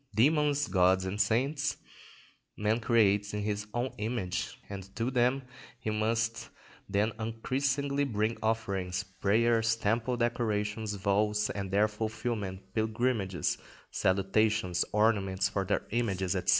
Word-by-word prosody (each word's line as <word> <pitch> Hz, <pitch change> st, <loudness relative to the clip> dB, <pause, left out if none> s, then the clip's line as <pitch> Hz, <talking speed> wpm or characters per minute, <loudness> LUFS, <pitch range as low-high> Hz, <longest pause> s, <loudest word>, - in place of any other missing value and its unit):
Demons, 145 Hz, +4 st, +3 dB
gods, 95 Hz, 0 st, +3 dB
and 100 Hz, +3 st, -1 dB
saints 140 Hz, +6 st, +1 dB, 0.8 s
man 105 Hz, +2 st, +1 dB
creates 105 Hz, -3 st, +3 dB
in 105 Hz, -, -2 dB
his 105 Hz, 0 st, -2 dB
own 120 Hz, +3 st, -1 dB
image; 105 Hz, -4 st, -2 dB
and 95 Hz, -1 st, -8 dB
to 115 Hz, +3 st, -1 dB
them 125 Hz, +2 st, +2 dB, 0.3 s
he 110 Hz, -2 st, -3 dB
must 115 Hz, +1 st, 0 dB, 0.4 s
then 105 Hz, +3 st, +2 dB
unceasingly 135 Hz, +5 st, 0 dB
bring 110 Hz, -3 st, 0 dB
offerings, 95 Hz, -4 st, -1 dB
prayers, 115 Hz, +4 st, +2 dB
temple 115 Hz, +3 st, 0 dB
decorations, 110 Hz, -3 st, -1 dB
vows 105 Hz, +2 st, +1 dB
and 100 Hz, -2 st, -4 dB
their 100 Hz, +3 st, +3 dB
fulfilment, 105 Hz, -3 st, -4 dB
pilgrimages, 110 Hz, -4 st, 0 dB, 0.3 s
salutations, 95 Hz, 0 st, +2 dB
ornaments 100 Hz, -3 st, +2 dB
for 100 Hz, -1 st, -1 dB
their 100 Hz, -, 0 dB
images, 95 Hz, -6 st, 0 dB
&c. -, -, +1 dB
110 Hz, 120 wpm, -30 LUFS, 100-115 Hz, 0.8 s, Demons